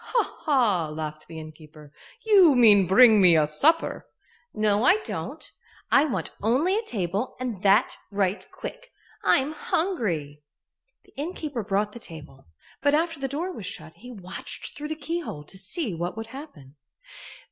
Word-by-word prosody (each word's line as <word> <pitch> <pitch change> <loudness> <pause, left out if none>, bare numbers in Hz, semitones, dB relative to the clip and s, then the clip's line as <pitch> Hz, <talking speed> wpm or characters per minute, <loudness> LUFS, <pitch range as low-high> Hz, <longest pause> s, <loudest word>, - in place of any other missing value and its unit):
"Ha! - - -1
ha!" 220 - +2
laughed 155 0 -6
the 165 - -10
innkeeper. 155 -1 -12 0.3
"You 380 -9 +6
mean 210 -6 +6
bring 215 +2 +7
me 175 -3 +6
a 155 - +4
supper." 295 - +2 0.4
"No, 210 0 +1
I 370 +10 +5
don't. - - -6 0.4
I 280 - +5
want 285 - -3
only 270 - +2
a 440 - +1
table 205 - -3
and 240 -7 -4
that 200 +4 +3
right 200 0 0
quick. - - -9 0.3
I'm 275 +2 +3
hungry." 205 - -2 0.6
The - - -25
innkeeper 290 -5 -4
brought 205 +1 0
the 235 - -10
table, 150 - -10 0.3
but 285 0 +3
after 330 -1 -1
the 270 - -2
door 315 +8 -3
was 215 - -7
shut 160 -4 -7
he 245 - -13
watched 190 -7 -7
through 295 +1 -6
the 315 - -3
keyhole 315 - -5
to 170 - -11
see 200 - -2
what 175 +4 -4
would 225 0 -5
happen. 155 - -11
215 Hz, 160 wpm, -25 LUFS, -, 0.6 s, bring